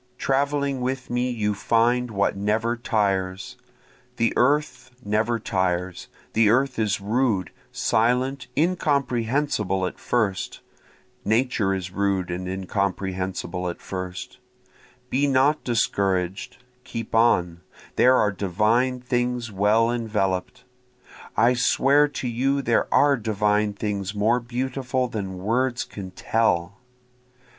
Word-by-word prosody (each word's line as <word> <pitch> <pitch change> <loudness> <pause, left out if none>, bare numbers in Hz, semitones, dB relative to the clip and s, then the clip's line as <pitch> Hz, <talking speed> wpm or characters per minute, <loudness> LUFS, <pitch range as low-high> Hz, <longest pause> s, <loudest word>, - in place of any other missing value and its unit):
Traveling 140 0 0
with 130 0 -3
me 125 +1 0
you 105 -4 -1
find 120 +4 +1
what 100 -2 0
never 110 +4 0
tires. 100 -1 -1 0.6
The 115 -1 +1
earth 130 -1 +1 0.2
never 110 +3 +1
tires, 95 -4 -2 0.3
The 110 -1 +4
earth 130 +2 +2
is 105 -2 +1
rude, 105 -2 0 0.2
silent, 125 +5 0
incomprehensible 135 - 0
at - - -5
first, 105 -6 -1 0.6
Nature 110 -3 +1
is 90 -1 -5
rude 95 -2 -1
and 90 +1 -4
incomprehensible 95 -1 -3
at 85 - -7
first, 90 -1 -6 0.7
Be 140 +3 +2
not 140 +3 +2
discouraged, 95 -6 -1 0.3
keep 115 -2 -6
on, 90 -7 +2 0.3
there 130 +1 +5
are 105 -4 +3
divine 110 +7 +1
things 125 -2 -1
well 105 +4 +3
envelop'd, 110 0 -2 0.7
I 120 +2 +5
swear 140 +3 +3
to 140 -3 -5
you 135 +4 0
there 120 -2 +1
are 145 -1 +4
divine 105 -1 +1
things 100 -1 -3
more 110 +4 +2
beautiful 125 +1 -2
than 100 -5 -5
words 120 +6 0
can 95 -2 -8
tell. 95 -2 0
115 Hz, 115 wpm, -24 LUFS, 95-125 Hz, 0.7 s, there